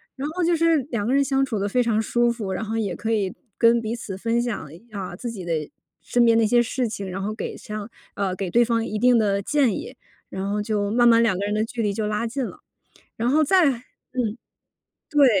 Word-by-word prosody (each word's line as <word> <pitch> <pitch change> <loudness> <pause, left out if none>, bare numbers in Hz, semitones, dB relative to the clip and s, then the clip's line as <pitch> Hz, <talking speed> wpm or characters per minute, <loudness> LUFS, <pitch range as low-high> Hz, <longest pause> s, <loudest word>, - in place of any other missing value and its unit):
然 280 +2 -3
后 355 +2 -2
就 340 0 +3
是 330 0 +3
两 210 -4 -2
个 250 - +1
人 280 0 +4
相 270 0 +1
处 225 -6 -3
得 200 +1 -1
非 250 +3 +2
常 220 -2 +1
舒 240 +2 +2
服， 215 -5 -4
然 205 +4 -3
后 220 +2 -3
也 200 -6 -1
可 225 0 -3
以 200 -4 +1 0.2
跟 235 0 +4
彼 225 +1 -3
此 195 -5 -6
分 230 +3 0
享 210 -11 -4
一 175 - -14
啊， 185 -4 -5
自 240 +5 -5
己 195 -6 -7
的 170 - -1 0.5
身 240 -1 +2
边 230 -1 +5
那 225 -1 +4
些 240 +2 +4
事 240 0 -1
情， 200 -2 -5
然 190 +2 -4
后 210 +2 -2
给 - - -5
上 210 -1 -6 0.3
呃， 195 -2 -1
给 190 -1 -3
对 240 +3 +4
方 230 -1 +1
一 215 -1 -3
定 245 +1 +4
的 200 -2 +1
建 280 -4 +2
议， - - -7 0.3
然 195 +1 -3
后 210 - 0
就 205 -1 -1
慢 240 +2 +4
慢 230 0 +6
两 195 -6 +2
个 200 - -2
人 210 - -1
的 215 +1 +1
距 230 0 -3
离 205 -1 0
就 210 0 -2
拉 215 +2 -1
近 260 +3 -2
了。 - - -6 0.6
然 230 +2 0
后 310 +3 +4
再 365 +2 +4
嗯， 245 -2 -5 0.7
对， 290 -2 +6
225 Hz, 265 characters per minute, -23 LUFS, 205-245 Hz, 0.7 s, 慢